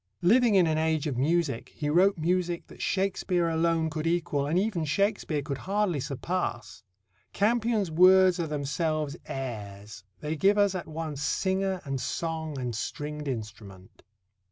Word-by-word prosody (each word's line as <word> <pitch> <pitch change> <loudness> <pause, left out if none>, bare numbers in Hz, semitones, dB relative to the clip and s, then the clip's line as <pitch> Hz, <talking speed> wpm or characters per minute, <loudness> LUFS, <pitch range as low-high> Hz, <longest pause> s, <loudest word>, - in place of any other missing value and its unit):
Living 230 +4 +5
in 185 -3 +6
an 155 -1 +1
age 160 -2 0
of 145 -4 -2
music, 145 -1 0
he 150 - -3
wrote 180 +6 +4
music 175 +1 -1
that - - -13
Shakespeare 190 -2 0
alone 165 0 +1
could 155 0 -3
equal 165 -4 0
and 160 +4 +1
even 190 -4 0
Shakespeare 165 -2 0
could 140 -1 -4
hardly 195 -3 0
surpass. 135 - -3 0.5
Campion's 220 -3 +1
words 185 +2 +6
are 165 - -1
themselves 150 +1 -2
airs. 105 -6 -6 0.2
They 150 +1 -3
give 195 +6 +3
us 205 -1 +3
at 185 -3 -5
once 155 -2 -5
singer 190 +3 0
and 135 -2 -3
song 160 -3 -3
and 125 -2 -3
stringed 150 +5 -5
instrument. 105 -6 -7
160 Hz, 150 wpm, -28 LUFS, 145-185 Hz, 0.5 s, in